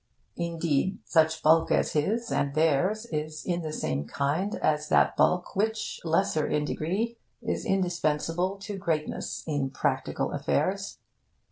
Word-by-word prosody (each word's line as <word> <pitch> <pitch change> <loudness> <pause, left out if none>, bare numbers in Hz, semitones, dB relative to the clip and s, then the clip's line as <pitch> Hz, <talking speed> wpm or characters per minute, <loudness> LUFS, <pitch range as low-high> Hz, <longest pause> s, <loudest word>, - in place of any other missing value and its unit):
Indeed, 170 +1 0
such 160 -1 +2
bulk 160 +1 +5
as - - +2
his 220 +10 0
and 140 0 0
theirs 165 +8 +2
is 155 0 -4
in 175 -1 0
the 155 -2 -4
same 70 - -2
kind 150 - -1
as 150 0 0
that - - +4
bulk 180 +2 +2
which, 220 +2 -1
lesser 160 -2 +1
in 150 0 0
degree, 205 +11 -2 0.3
is 225 - -2
indispensable 175 0 0
to 200 -1 -5
greatness 160 -5 -2
in 145 -4 -1
practical 135 - -1
affairs. - - -1
165 Hz, 135 wpm, -28 LUFS, 150-190 Hz, 0.3 s, bulk